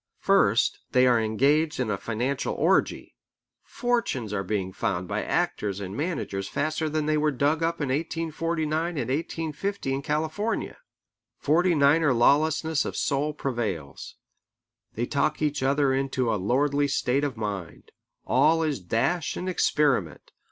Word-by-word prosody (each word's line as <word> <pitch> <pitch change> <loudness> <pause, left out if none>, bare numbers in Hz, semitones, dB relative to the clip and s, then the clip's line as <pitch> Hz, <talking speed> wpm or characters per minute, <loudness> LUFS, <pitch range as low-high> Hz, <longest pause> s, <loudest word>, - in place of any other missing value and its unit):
First, - - +2
they 125 0 +5
are 120 -2 +4
engaged 140 +9 +1
in 120 -4 0
a 100 - -1
financial 125 +5 -2
orgy. - - +1 0.5
Fortunes 230 - -2
are 100 - -1
being 95 -1 -2
found 90 -1 -2
by - - -2
actors 100 -2 -1
and 95 0 -6
managers 140 - -3
faster 155 +5 -1
than 155 0 -1
they 155 0 +1
were 155 0 +2
dug 145 +3 0
up 165 +1 0
in 145 -3 -2
1849 165 +2 -2
and 125 -2 -2
1850 160 +2 -3
in 135 - -2
California. 155 +10 -2 0.6
Forty 170 +4 +2
niner 145 -1 +4
lawlessness 155 +5 +3
of - - -5
soul 145 +1 0
prevails. 115 - -4 0.8
They 120 - -1
talk 145 +3 0
each 150 -2 -1
other 135 0 +2
into 130 -3 0
a - - +1
lordly 140 +8 +1
state 140 0 0
of 135 -5 -2
mind. 100 -6 -6 0.3
All 165 +1 +3
is 150 -3 -1
dash 115 - -1
and 180 - -4
experiment. 145 - 0
140 Hz, 145 wpm, -26 LUFS, 120-155 Hz, 0.8 s, they